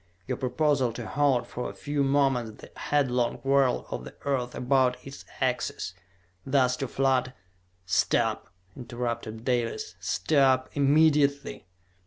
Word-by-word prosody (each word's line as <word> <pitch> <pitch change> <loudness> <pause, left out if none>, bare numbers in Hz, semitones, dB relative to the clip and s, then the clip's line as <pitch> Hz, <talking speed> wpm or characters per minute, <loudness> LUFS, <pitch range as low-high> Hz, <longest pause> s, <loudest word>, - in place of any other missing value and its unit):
Your - - -3
proposal 135 -1 +1
to 120 0 -6
halt 140 -1 +1
for 125 - -5
a - - -10
few 145 -1 -1
moments 135 -5 +1
the - - -13
headlong 125 -5 0
whirl 135 -1 +2
of - - -4
the - - -11
earth 130 -3 -1
about 125 0 +2
its 135 0 -10
axis, 125 -8 -2 0.5
thus 130 -2 +2
to 135 - -3
flood 130 -1 +1 0.3
" 90 0 -41
"Stop!" 95 - +1 0.3
interrupted 120 -2 -5
Dalis. 115 -6 -1
"Stop! 130 - +2
Immediately!" 145 - +2
130 Hz, 130 wpm, -27 LUFS, 120-140 Hz, 0.5 s, whirl